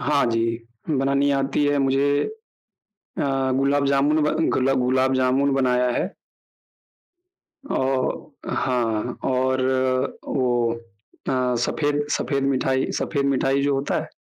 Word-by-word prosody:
हाँ 145 -2 +2
जी, 115 0 +1 0.4
बनानी 140 0 +2
आती 135 +2 0
है 145 0 +2
मुझे 135 +1 +2 0.9
अ, 135 -8 -2
गुलाब 140 +1 +2
जामुन 145 +3 +2
बन 160 +2 +1
गुला 135 +1 +2
गुलाब 130 +1 +2
जामुन 130 +2 +2
बनाया 125 -2 +2
है। - - -1 1.6
औ - - 0 0.7
हाँ 120 -2 -1
और 130 0 +1 0.6
वो 130 -2 0 0.8
अ, - - +1 0.3
सफेद 145 +1 0
सफेद 140 -2 -1
मिठाई 130 0 0
सफेद 140 -3 -1
मिठाई 135 0 +1
जो 140 0 +1
होता 135 +1 -1
है, - - -8
135 Hz, 120 wpm, -23 LUFS, 130-140 Hz, 1.6 s, हाँ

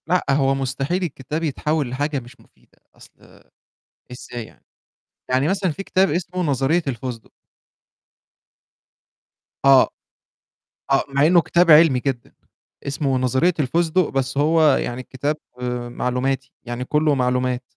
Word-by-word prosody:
لأ، 180 0 +1
هو 135 -1 +2
مستحيل 135 +7 -2
الكتاب 155 0 -4
يتحول 150 -1 -1
لحاجة 145 +3 -2
مش 120 0 -15
مفيدة، - - -27 0.2
أصل - - -19 0.7
إزاي 120 -1 -8
يعني؟ - - -21 0.6
يعني 130 +3 +2
مثلًا 190 -1 0
في 195 +6 -7
كتاب 190 -1 +2
اسمه 180 +2 -3
نظرية 145 +3 +1
الفسدق. 125 -2 -5 2.3
آه، 135 -1 +6 1.0
آه، 135 - +3
مع 140 +1 +2
إنه 175 +1 +5
كتاب 170 +1 +2
علمي 150 -4 +6
جدًا، 130 -3 -4 0.5
اسمه 140 -1 -1
نظرية 130 +8 +1
الفسدق، 165 +5 +1
بس 135 0 -2
هو 160 +3 +3
يعني 120 +1 -3
كتاب 140 +4 -3 0.6
معلوماتي، 130 +2 -2
يعني 120 +1 -5
كلّه 150 +2 +1
معلومات. 125 -1 0
135 Hz, 120 wpm, -21 LUFS, 130-160 Hz, 2.3 s, آه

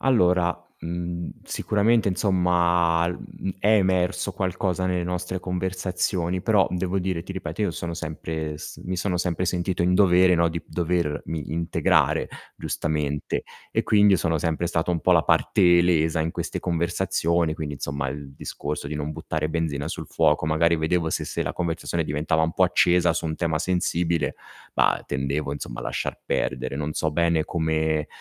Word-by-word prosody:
Allora, 90 -8 +3 0.2
mhmm, 85 +1 -4
sicuramente, 105 +1 +1
insomma, 85 -3 +2
l 90 - -3
mhmm, 95 - -6
è 105 - 0
emerso 95 0 +1
qualcosa 95 0 -1
nelle 90 -1 0
nostre 90 +1 -3
conversazioni, 90 0 -2
però 100 -1 +3
devo 90 +1 -1
dire, 90 -2 -2
ti 95 - -7
ripeto, 90 0 -5
io 100 -5 +1
sono 85 0 -4
sempre 80 -2 -4
s - - -8
mi 90 +1 -3
sono 90 -1 0
sempre 90 0 -1
sentito 90 0 -1
in 90 +1 +3
dovere, 90 -2 +5
no, 85 0 +3
di 85 +1 -4
dovermi 80 -3 -2
integrare 85 0 +2 0.3
giustamente 75 -2 -2 0.3
e - - +1
quindi 105 -2 +5
io 90 - +3
sono 80 -1 +1
sempre 80 +2 -1
stato 85 0 0
un 85 - 0
po' - - +2
la - - +5
parte 85 -1 +4
lesa 80 -2 +2
in 80 +1 0
queste - - -4
conversazioni. 85 -1 0
Quindi, 75 -2 -5
insomma, 70 0 -3
il 70 0 -7
discorso 75 +1 -5
di 75 - -4
non 75 +1 -3
buttare 75 0 -3
benzina 80 -3 -2
sul - - -5
fuoco. 75 +1 +2
Magari 85 +2 +3
vedevo 80 +1 0
se - - -1
se - - -3
la - - -3
conversazione 85 -1 -2
diventava 75 +1 0
un 80 +1 +1
po' 95 - +3
accesa 90 -1 +4
su 85 - -2
un 80 -1 -2
tema 80 -3 0
sensibile, 85 -3 0 0.4
bah, - - +2
tendevo 70 +2 -2
insomma - - -6
a - - -7
lasciar - - -3
perdere. 65 +1 -1
Non 75 +1 -3
so 80 - 0
bene 85 -1 +2
come 80 -2 0
85 Hz, 170 wpm, -24 LUFS, 80-90 Hz, 0.4 s, dovere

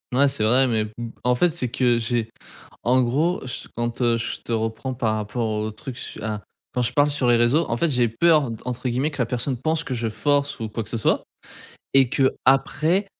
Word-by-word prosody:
Ouais, 140 +2 +5
c'est 135 -5 -1
vrai, 125 +5 +4
mais 110 -3 +1
b - - -8 0.3
en 125 0 +3
fait 175 +7 +3
c'est 130 -7 -2
que 120 -1 +2
j'ai 115 -1 -1 0.5
en 125 +2 +3
gros 145 +9 +1
je 125 - -5
quand 120 0 0
je 115 - -3
te - - -5
reprends 115 +3 -2
par 115 -3 0
rapport 110 +2 -2
au 110 0 -2
truc 115 +4 -8
su - - -7
a 105 -2 -3 0.3
quand 125 - +1
je 120 - 0
parle 145 0 +4
sur 145 -3 0
les 120 -1 +5
réseaux 120 +8 +3
en 115 - +1
fait 170 - +2
«j'ai 125 -3 +2
peur» 150 +3 +3
de 115 - -6
entre 125 +1 -3
guillemets 130 +6 0
que 145 - -10
la - - +2
personne 125 +3 -2
pense 160 +5 0
que 150 -5 -4
je 115 -1 -1
force 140 +6 0
ou 110 - -3
quoi 115 +2 -4
que - - -6
ce 115 - -1
soit. - - +1 0.7
Et 135 -2 +6
qu'après, 140 - +2
125 Hz, 225 wpm, -23 LUFS, 115-140 Hz, 0.7 s, Et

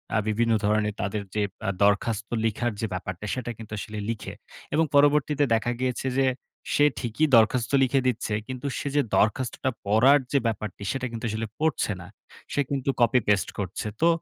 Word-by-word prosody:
আ - - +4
বিভিন্ন 115 +2 +1
ধরণের 105 0 +1
তাদের 100 +1 -2
যে 105 - +1 0.3
আ - - +2
দরখাস্ত 105 +2 +1 0.2
লিখার 115 +2 0
যে - - 0
ব্যাপারটা, 95 +1 -5
সেটা 125 -2 -4
কিন্তু 110 -2 -11
আসলে 105 +1 -6
লিখে 115 -3 -4 0.4
এবং 160 +2 +3
পরবর্তীতে 145 0 +4
দেখা 115 +2 +1
গিয়েছে 130 0 -1
যে, 135 - +4 0.5
সে 145 - +5
ঠিকই 120 +6 0
দরখাস্ত 115 +2 +3
লিখে 135 +1 +2
দিচ্ছে। 120 -3 -1
কিন্তু 130 +1 -5
সে - - -4
যে 145 - +5
দরখাস্তটা 125 +5 +1 0.2
পড়ার 120 +8 +5
যে 145 - +3
ব্যাপারটা, 105 -3 -4
সেটা 135 -1 -3
কিন্তু 115 0 -5
আসলে 110 +1 -3
পড়ছে 155 -7 +1
না। 90 - -10 0.5
সে 145 - +2
কিন্তু 140 -1 -2
কপি 120 +2 +5
পেস্ট 100 -4 +2
করছে। 100 +3 -3
তো 165 - +5
115 Hz, 175 wpm, -26 LUFS, 105-135 Hz, 0.5 s, সে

